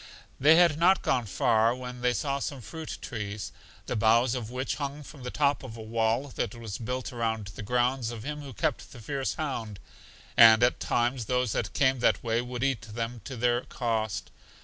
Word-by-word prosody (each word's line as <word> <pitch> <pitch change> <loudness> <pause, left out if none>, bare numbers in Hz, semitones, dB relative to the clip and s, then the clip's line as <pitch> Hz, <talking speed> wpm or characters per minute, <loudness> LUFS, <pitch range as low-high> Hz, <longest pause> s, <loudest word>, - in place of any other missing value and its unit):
They 150 +4 +7
had 170 -3 +5
not 185 +3 +4
gone 120 -4 +1
far 110 +5 +2
when 125 -1 -7
they 125 0 +2
saw 140 0 -1
some 140 0 -4
fruit 160 +7 -7
trees, 105 -2 -5 0.3
the - - -3
boughs 115 +3 +4
of 120 -4 -4
which 130 +2 -3
hung 145 0 -4
from 145 0 -12
the 125 - -5
top 145 +1 +1
of 115 -4 -9
a - - -7
wall 115 +4 0
that 125 - -3
was 115 -4 -6
built 125 +2 -4
around 110 -4 -2
the - - -8
grounds 125 +2 0
of 115 -2 -7
him 150 +2 -5
who 140 -2 -8
kept 110 - -2
the 120 - -11
fierce 135 +4 -3
hound, 115 -9 -4 0.6
and 115 0 +8
at 125 - +3
times 120 0 0
those 125 0 0
that 105 - -2
came 130 -2 +2
that - - +2
way 115 0 +1
would 125 0 -4
eat 135 -5 +1
them 115 +2 -5
to 135 - -6
their 120 +1 +2
cost. 110 -4 -2
120 Hz, 200 wpm, -28 LUFS, 115-135 Hz, 0.6 s, and